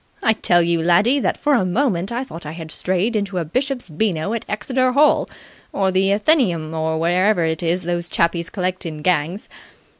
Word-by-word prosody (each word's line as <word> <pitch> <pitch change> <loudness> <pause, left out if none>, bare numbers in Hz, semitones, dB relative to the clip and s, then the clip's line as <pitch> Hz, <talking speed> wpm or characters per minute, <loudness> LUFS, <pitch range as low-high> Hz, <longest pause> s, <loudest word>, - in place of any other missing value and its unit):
I 220 - +4
tell 175 -5 +2
you, 170 -1 +1
laddie, 200 +11 +3
that - - -1
for 295 - +1
a 240 - +3
moment 190 -1 0
I 240 +2 -2
thought 170 -10 -10
I 150 +1 -7
had 160 -1 -8
strayed 190 +8 -1
into 200 -3 -2
a 170 - -1
Bishop's 255 - -2
Beano 175 +2 -1
at 230 - -4
Exeter 255 +5 0
Hall 295 +3 +3 0.4
or 190 -1 0
the 190 +1 +2
Athenaeum 200 - +1
or 160 0 -1
wherever 175 +3 +2
it 160 0 -1
is 175 +2 0
those 175 0 -3
chappies 170 0 0
collect 185 -1 -3
in 155 -3 -7
gangs. 175 +3 0
185 Hz, 190 wpm, -20 LUFS, 170-220 Hz, 0.4 s, I